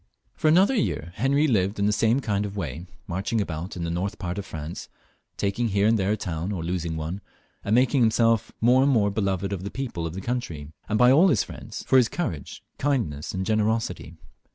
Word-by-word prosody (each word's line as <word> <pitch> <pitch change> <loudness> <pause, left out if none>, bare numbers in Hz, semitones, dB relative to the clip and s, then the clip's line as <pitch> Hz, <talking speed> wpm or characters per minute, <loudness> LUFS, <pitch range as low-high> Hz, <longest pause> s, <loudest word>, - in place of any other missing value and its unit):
For - - -1
another 185 +10 +5
year 135 - -1
Henry 140 +6 +2
lived 100 -5 +1
in 100 - +1
the 105 - +3
same 115 +5 +2
kind 105 -4 -1
of 105 0 -5
way, 85 0 -5 0.2
marching 100 +4 -2
about 85 -2 -4
in 90 - -4
the 85 - -2
north 95 +5 -2
part 90 +2 -4
of 100 - -6
France, 80 -1 -7 0.5
taking 100 +4 0
here 100 -1 +1
and 110 0 +3
there 95 +2 +1
a - - -2
town, 85 0 -3
or 90 -5 -3
losing 85 -1 -2
one; 80 +6 -4 0.4
and 105 - +1
making 130 +2 +3
himself 115 -1 +3
more 125 +3 +5
and 140 +1 +4
more 105 -5 +3
beloved 100 -1 -1
by 100 - -1
the 95 +3 -6
people 115 -11 -4
of 80 - -7
the - - -4
country, 85 -11 -4 0.2
and 110 - +1
by 125 +2 +6
all 160 +8 +6
his 130 - +2
Mends, - - -8
for 130 - +4
his 120 -3 +4
courage, 85 - -4 0.2
kindness, 115 - -1
and 95 0 -3
generosity. 110 -6 -1
100 Hz, 215 wpm, -25 LUFS, 90-120 Hz, 0.5 s, by